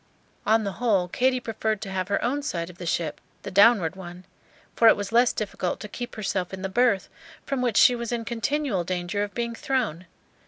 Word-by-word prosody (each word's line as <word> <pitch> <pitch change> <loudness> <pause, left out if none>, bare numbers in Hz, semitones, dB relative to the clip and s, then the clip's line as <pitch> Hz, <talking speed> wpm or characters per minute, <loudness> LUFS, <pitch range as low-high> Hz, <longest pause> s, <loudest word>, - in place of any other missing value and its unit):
On 220 +1 +4
the 200 - -2
whole, 200 -7 +2
Katy 255 +7 +1
preferred 220 -2 -2
to 200 -3 -6
have 185 -1 -2
her 200 - +1
own 275 +5 0
side 175 - -3
of 175 - -21
the 175 - -6
ship, 160 -3 -2 0.2
the 200 - -6
downward 200 -3 +5
one; 180 -1 -10 0.5
for 230 - +5
it - - +8
was 205 -1 -4
less 240 +1 +4
difficult 195 -4 -3
to 210 - -7
keep 240 +3 -7
herself 190 -4 -2
in 190 0 -7
the 195 - -2
berth, 230 -2 +2 0.4
from 275 -2 -2
which 240 -4 +1
she 250 - +7
was 235 -1 -4
in 235 -1 -2
continual 240 -3 -1
danger 180 +3 -2
of 205 -1 -4
being 235 -1 -2
thrown. 230 - -2
210 Hz, 210 wpm, -25 LUFS, 185-240 Hz, 0.5 s, it